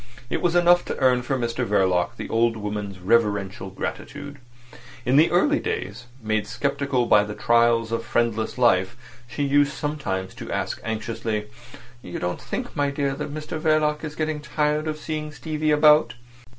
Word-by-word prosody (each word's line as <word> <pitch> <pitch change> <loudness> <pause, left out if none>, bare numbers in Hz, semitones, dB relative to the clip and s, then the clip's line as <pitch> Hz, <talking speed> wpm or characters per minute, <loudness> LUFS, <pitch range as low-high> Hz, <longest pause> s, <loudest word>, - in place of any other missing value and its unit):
It - - -1
was 175 -1 +1
enough 175 0 +5
to - - -4
earn 125 -2 +3
for 135 +2 -1
Mr 120 0 -2
Verloc 95 -5 +1
the - - -5
old 115 0 +1
woman's 105 -2 -4
reverential 100 -1 0
gratitude. 145 +8 -6 0.7
In 125 +2 +2
the 155 +4 +6
early 290 +13 +3
days, 445 - -4 0.2
made 110 -1 0
sceptical 140 -2 -1
by 105 -3 +5
the 105 0 -6
trials 115 -1 +3
of 115 0 -1
friendless 115 -1 -1
life, 115 -3 +3 0.3
she 120 +5 -3
used 145 +1 +3
sometimes 135 -12 -3
to - - -8
ask - - -3
anxiously: 110 -1 -3 0.5
"You 90 - -7
don't 90 0 -3
think, - - -5
my 145 -1 +1
dear, 140 -1 -1
that 140 - -5
Mr 155 +1 -5
Verloc 155 -1 +1
is 150 -1 -5
getting 155 -1 -2
tired 150 +1 -1
of 155 0 -2
seeing 155 -1 -4
Stevie 155 0 -3
about?" 150 -1 +5
125 Hz, 165 wpm, -24 LUFS, 110-150 Hz, 0.7 s, the